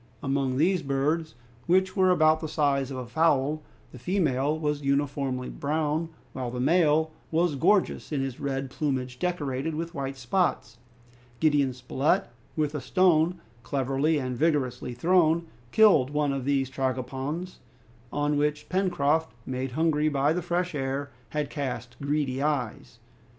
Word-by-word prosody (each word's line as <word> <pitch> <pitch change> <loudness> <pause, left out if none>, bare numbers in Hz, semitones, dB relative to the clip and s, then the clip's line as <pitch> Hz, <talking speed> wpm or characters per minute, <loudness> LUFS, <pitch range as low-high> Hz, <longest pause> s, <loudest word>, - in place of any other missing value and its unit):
Among 135 -2 0
these 180 +4 +3
birds, 150 +3 -1 0.3
which 185 +2 +3
were 190 -2 +4
about 155 -3 +4
the 160 - -4
size 140 -3 +1
of 135 - -5
a 125 - -4
fowl, 155 +1 +1 0.3
the 125 - -11
female 150 - +1
was 150 -2 -1
uniformly 140 -2 -1
brown, 155 +2 -1 0.2
while 130 -2 -3
the 125 +1 -5
male 160 +2 +3 0.2
was 165 0 +2
gorgeous 185 +8 +1
in 145 - 0
his 135 -2 -3
red 135 -1 -3
plumage, 130 -4 -2
decorated 155 -4 -2
with 165 +2 -4
white 135 -3 -4
spots. 120 - -1 0.6
Gideon 145 -4 +3
Spilett, 130 +3 0 0.3
with 150 -2 0
a 150 - -3
stone 175 +3 +3 0.2
cleverly 135 +4 0
and 130 -3 -2
vigorously 135 -4 0
thrown, 170 +3 +3 0.3
killed 205 -12 +5
one 145 -1 0
of 135 -2 -3
these 135 -1 +1
tragopans, 135 +6 -3 0.5
on 145 0 0
which 150 0 -1
Pencroft, 160 -4 +1
made 130 0 -3
hungry 155 0 +2
by 145 +1 +2
the 180 - -1
fresh 175 +1 -1
air, 140 0 -3 0.2
had 150 -2 -2
cast 125 -5 -4
greedy 140 -2 -1
eyes. 135 -7 -2
145 Hz, 145 wpm, -27 LUFS, 135-160 Hz, 0.6 s, killed